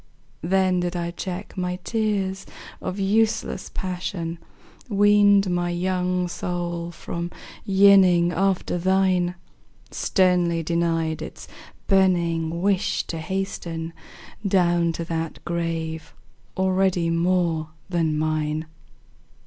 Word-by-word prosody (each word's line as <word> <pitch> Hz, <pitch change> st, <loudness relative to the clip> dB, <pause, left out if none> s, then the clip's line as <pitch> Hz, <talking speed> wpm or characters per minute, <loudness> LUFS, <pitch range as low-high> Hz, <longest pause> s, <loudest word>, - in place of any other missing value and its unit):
Then 185 Hz, +1 st, +2 dB
did 175 Hz, 0 st, -2 dB
I 170 Hz, 0 st, -2 dB
check 185 Hz, +2 st, -6 dB
my 180 Hz, -1 st, -2 dB
tears 200 Hz, -4 st, -1 dB, 0.3 s
of 185 Hz, -, -4 dB
useless 215 Hz, 0 st, 0 dB
passion, 175 Hz, -2 st, -4 dB, 0.5 s
Weaned 205 Hz, -1 st, +5 dB
my 175 Hz, -1 st, 0 dB
young 180 Hz, 0 st, 0 dB
soul 175 Hz, -1 st, -3 dB
from 170 Hz, +1 st, -5 dB, 0.4 s
yearning 190 Hz, -3 st, +6 dB
after 185 Hz, 0 st, 0 dB
thine, 185 Hz, -1 st, +2 dB, 0.6 s
Sternly 180 Hz, -3 st, +2 dB
denied 165 Hz, -1 st, 0 dB
its -, -, -8 dB, 0.4 s
burning 170 Hz, -3 st, +2 dB
wish 200 Hz, -1 st, +1 dB
to 165 Hz, -, -5 dB
hasten 170 Hz, -2 st, -4 dB, 0.5 s
Down 175 Hz, -4 st, +2 dB
to 170 Hz, -, -4 dB
that 165 Hz, -1 st, -3 dB
grave 165 Hz, -2 st, -3 dB, 0.4 s
already 185 Hz, -2 st, +2 dB
more 165 Hz, -2 st, +1 dB, 0.2 s
than 165 Hz, -4 st, 0 dB
mine! 155 Hz, 0 st, -1 dB
175 Hz, 100 wpm, -24 LUFS, 170-190 Hz, 0.6 s, yearning